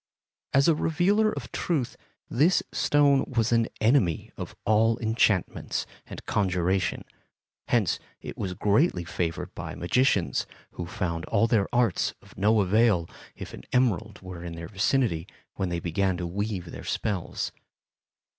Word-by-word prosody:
As 135 +2 +4
a 165 - +6
revealer 185 +8 +2
of - - -6
truth, 150 -9 -1 0.3
this 160 +8 +3
stone 145 -2 +3
was 115 -3 0
an 115 -1 +3
enemy 110 - +2
of - - -7
all 110 +1 +3
enchantments 110 -5 0 0.2
and - - -9
conjurations; 95 -2 0 0.6
hence 110 -8 +2 0.2
it - - -8
was 95 -3 -4
greatly 105 - +2
favored 85 +1 -3
by 85 -1 -6
magicians, 100 0 +1 0.2
who 85 - -6
found 85 -2 -3
all 110 0 +2
their 110 -4 +2
arts 120 -6 +1
of - - -19
no 105 +3 +3
avail 100 -3 +3 0.3
if - - -8
an - - -8
emerald 110 -4 +1
were 90 -2 -8
in 85 -1 -6
their 85 0 -7
vicinity 100 -4 +1 0.3
when 95 - -2
they 85 -1 -1
began 90 +2 0
to 90 - -3
weave 95 -1 -3
their - - -8
spells. 100 -5 -2
105 Hz, 145 wpm, -27 LUFS, 90-120 Hz, 0.6 s, a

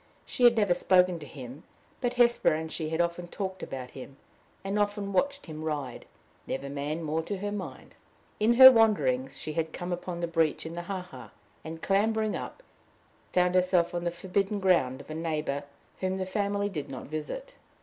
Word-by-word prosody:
She 245 - +1
had 235 -1 +6
never 205 -5 +4
spoken 180 -1 +3
to 150 - -9
him, 130 +1 -9 0.4
but 245 -1 0
Hesper 240 -1 +4
and 160 0 -4
she 155 -2 -3
had 160 +1 -2
often 175 0 -1
talked 190 +1 -5
about 130 -2 -6
him, 135 +1 -10 0.5
and 195 +2 -1
often 205 -1 -1
watched 280 +9 0
him 155 -2 -7
ride 145 -6 -4 0.4
never 140 +1 -4
man 145 +3 -3
more 160 +1 -1
to 200 +5 -4
her 205 +2 -3
mind. 180 -11 -7 0.5
In 225 +3 +4
her 260 +1 +12
wanderings 140 - +2
she 155 - -5
had 160 0 -2
come 175 0 -5
upon 175 0 -5
the 170 - -1
breach 165 -2 +1
in 160 - -6
the 175 - -4
ha 185 +1 -4
ha, 180 +1 -11 0.3
and, 160 0 -8
clambering 215 +2 +1
up, - - -7 0.7
found 180 0 +3
herself 180 -2 +3
on 175 0 -2
the 175 - +1
forbidden 195 +4 -1
ground 140 -9 +2
of - - -12
a - - -3
neighbor 155 -3 -2 0.3
whom 185 0 -1
the 190 - -2
family 200 +1 -1
did 150 -8 -5
not 130 -2 -7
visit. 330 - -6
175 Hz, 190 wpm, -28 LUFS, 155-200 Hz, 0.7 s, her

